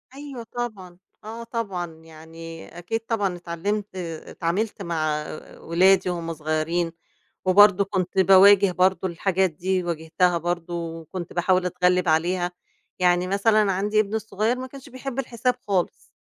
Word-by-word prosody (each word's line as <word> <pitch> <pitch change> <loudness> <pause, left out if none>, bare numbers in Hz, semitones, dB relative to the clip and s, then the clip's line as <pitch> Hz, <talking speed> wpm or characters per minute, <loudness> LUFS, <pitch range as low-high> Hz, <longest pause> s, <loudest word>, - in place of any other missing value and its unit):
أيوه 275 -4 -8
طبعًا، 215 -7 -6 0.3
آه 225 +2 -7
طبعًا 195 -8 -4
يعني 165 +1 -11
أكيد 205 +6 -3
طبعًا 210 -5 -1
اتعلمت 190 +4 -4
اتعاملت 175 +4 -3
مع 155 -3 -1 0.4
أولادي 185 +2 +3
وهم 170 -1 -3
صغيرين. 155 +2 -1 0.5
وبرضه 200 +1 +6
كنت 190 -1 -2
باواجه 195 +1 +7
برضه 185 +1 +2
الحاجات 190 +2 +1
دي 180 +3 -1
واجهتها 170 +1 +1
برضه 175 0 -3
وكنت 165 +1 -6
باحاول 180 +1 +2
أتغلب 180 0 +1
عليها. 175 +3 +1 0.5
يعني 180 0 +3
مثلًا 200 +1 +3
عندي 205 +3 +1
ابني 215 +1 -1
الصغير 220 +2 -1
ما 260 - -5
كانش 270 +1 -12
بيحب 265 0 -7
الحساب 250 -1 0
خالص. 190 -4 -2
185 Hz, 130 wpm, -24 LUFS, 170-210 Hz, 0.5 s, باواجه